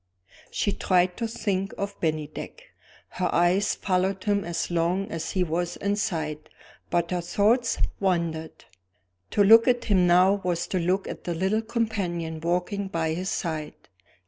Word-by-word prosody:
She 205 Hz, -, 0 dB
tried 180 Hz, -2 st, +2 dB
to 230 Hz, -, -1 dB
think 200 Hz, -4 st, -2 dB
of 200 Hz, 0 st, -4 dB
Bennydeck. 155 Hz, -, -3 dB, 0.5 s
Her 180 Hz, -, -2 dB
eyes 175 Hz, +4 st, +2 dB
followed 190 Hz, 0 st, 0 dB
him 205 Hz, -1 st, +1 dB
as 170 Hz, 0 st, -3 dB
long 175 Hz, +3 st, 0 dB
as 165 Hz, -1 st, -4 dB
he 185 Hz, -, +2 dB
was 175 Hz, +1 st, -2 dB
in 200 Hz, 0 st, 0 dB
sight, 160 Hz, -7 st, -3 dB, 0.4 s
but 170 Hz, 0 st, 0 dB
her 180 Hz, -1 st, 0 dB
thoughts 220 Hz, +7 st, +2 dB, 0.2 s
wandered. 170 Hz, -4 st, -1 dB, 0.6 s
To 205 Hz, -, +3 dB
look 225 Hz, +4 st, +7 dB
at 245 Hz, -1 st, +2 dB
him 185 Hz, -4 st, +3 dB
now 185 Hz, +3 st, +4 dB
was 175 Hz, -1 st, -1 dB
to 185 Hz, -, 0 dB
look 185 Hz, +3 st, 0 dB
at -, -, -7 dB
the 175 Hz, -, -2 dB
little 190 Hz, +6 st, +1 dB
companion 200 Hz, -8 st, -2 dB
walking 180 Hz, +4 st, -1 dB
by 165 Hz, -3 st, -1 dB
his 185 Hz, +3 st, -3 dB
side. 155 Hz, -3 st, -3 dB
180 Hz, 155 wpm, -26 LUFS, 170-200 Hz, 0.6 s, look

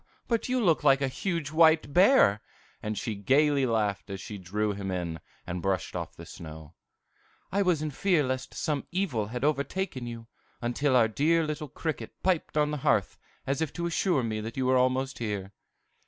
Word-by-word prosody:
But 230 Hz, +1 st, 0 dB
you 255 Hz, 0 st, +2 dB
look 175 Hz, -9 st, +3 dB
like 135 Hz, 0 st, +5 dB
a 140 Hz, -, +1 dB
huge 165 Hz, +1 st, -3 dB
white 160 Hz, -2 st, +4 dB
bear!" 180 Hz, -, +5 dB, 0.4 s
And 105 Hz, 0 st, -3 dB
she 115 Hz, -, -2 dB
gayly 135 Hz, +6 st, +3 dB
laughed 105 Hz, -4 st, 0 dB
as 95 Hz, -1 st, -5 dB
she 105 Hz, +1 st, -7 dB
drew 105 Hz, +4 st, -1 dB
him 100 Hz, -1 st, -5 dB
in, 85 Hz, -3 st, -3 dB, 0.3 s
and 90 Hz, 0 st, -4 dB
brushed 95 Hz, -1 st, -1 dB
off -, -, -5 dB
the -, -, -10 dB
snow. 80 Hz, -1 st, -10 dB, 0.8 s
"I 200 Hz, +2 st, +2 dB
was 175 Hz, -6 st, +2 dB
in 155 Hz, -, -2 dB
fear 175 Hz, +1 st, +2 dB
lest 130 Hz, 0 st, -3 dB
some 150 Hz, -3 st, -2 dB
evil 165 Hz, -, -1 dB
had 125 Hz, +3 st, -5 dB
overtaken 145 Hz, -1 st, -1 dB
you, 115 Hz, -1 st, -7 dB, 0.3 s
until 130 Hz, +3 st, +1 dB
our 120 Hz, -3 st, +5 dB
dear 160 Hz, +8 st, +2 dB
little 150 Hz, -1 st, -4 dB
cricket 160 Hz, +3 st, -4 dB
piped 180 Hz, -4 st, 0 dB
on 150 Hz, 0 st, +3 dB
the 150 Hz, -, -2 dB
hearth, 135 Hz, -, +1 dB, 0.3 s
as 135 Hz, +2 st, -1 dB
if 160 Hz, -3 st, -1 dB
to 170 Hz, -, -3 dB
assure 170 Hz, -4 st, +1 dB
me 110 Hz, -2 st, -2 dB
that 115 Hz, +3 st, -7 dB
you 130 Hz, -, 0 dB
were 130 Hz, 0 st, +3 dB
almost 130 Hz, +1 st, +1 dB
here." 105 Hz, -4 st, -3 dB
135 Hz, 190 wpm, -28 LUFS, 105-155 Hz, 0.8 s, like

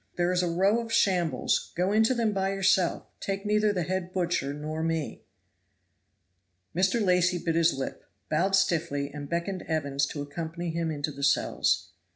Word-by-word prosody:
There 175 Hz, 0 st, +1 dB
is 180 Hz, 0 st, +2 dB
a 175 Hz, -, 0 dB
row 195 Hz, +6 st, +2 dB
of 230 Hz, -1 st, -6 dB
shambles, 180 Hz, -7 st, +1 dB
go 180 Hz, +3 st, +1 dB
into 220 Hz, +4 st, +3 dB
them 225 Hz, -3 st, +1 dB
by 195 Hz, 0 st, 0 dB
yourself, 190 Hz, -2 st, +2 dB
take 195 Hz, +1 st, -3 dB
neither 210 Hz, 0 st, +3 dB
the 180 Hz, -4 st, -1 dB
head 185 Hz, +1 st, -3 dB
butcher 175 Hz, -6 st, -1 dB
nor 155 Hz, +2 st, -4 dB
me." 165 Hz, -2 st, -2 dB, 1.5 s
Mr. 190 Hz, +5 st, +2 dB
Lacy 180 Hz, -3 st, +3 dB
bit 165 Hz, -1 st, -1 dB
his 165 Hz, -1 st, +3 dB
lip, 135 Hz, 0 st, -5 dB, 0.2 s
bowed 190 Hz, +5 st, +2 dB
stiffly, 160 Hz, -6 st, 0 dB
and 145 Hz, -1 st, -7 dB
beckoned 175 Hz, +2 st, -2 dB
Evans 140 Hz, -3 st, 0 dB
to 145 Hz, 0 st, -5 dB
accompany 165 Hz, +3 st, -5 dB
him 165 Hz, 0 st, -1 dB
into 150 Hz, -1 st, -3 dB
the 140 Hz, 0 st, -9 dB
cells. 90 Hz, -9 st, +1 dB
175 Hz, 170 wpm, -28 LUFS, 155-190 Hz, 1.5 s, into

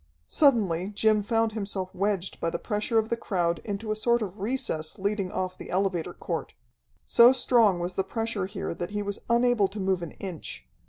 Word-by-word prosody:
Suddenly 200 Hz, -, +3 dB
Jim 215 Hz, 0 st, +3 dB
found 225 Hz, +1 st, +1 dB
himself 200 Hz, -3 st, -4 dB
wedged 195 Hz, -1 st, -1 dB
by 165 Hz, -, 0 dB
the -, -, -2 dB
pressure 210 Hz, +1 st, -1 dB
of 220 Hz, 0 st, +2 dB
the 235 Hz, -, +1 dB
crowd 175 Hz, -7 st, -1 dB
into 215 Hz, +1 st, -4 dB
a -, -, 0 dB
sort 235 Hz, +1 st, +2 dB
of 200 Hz, 0 st, -7 dB
recess 205 Hz, -8 st, -2 dB
leading 200 Hz, -1 st, -1 dB
off 185 Hz, 0 st, -2 dB
the -, -, -9 dB
elevator 185 Hz, -2 st, 0 dB
court. -, -, -4 dB, 0.5 s
So 235 Hz, +1 st, +7 dB
strong 230 Hz, -8 st, +3 dB
was 175 Hz, +1 st, -3 dB
the 190 Hz, -, 0 dB
pressure 225 Hz, -1 st, -2 dB
here 195 Hz, -, -4 dB
that 175 Hz, +1 st, -5 dB
he 205 Hz, 0 st, -2 dB
was 200 Hz, 0 st, -4 dB
unable 235 Hz, -3 st, +4 dB
to 200 Hz, +2 st, -8 dB
move 190 Hz, -2 st, 0 dB
an 170 Hz, -, -6 dB
inch. 185 Hz, -5 st, -7 dB
200 Hz, 195 wpm, -27 LUFS, 185-225 Hz, 0.5 s, So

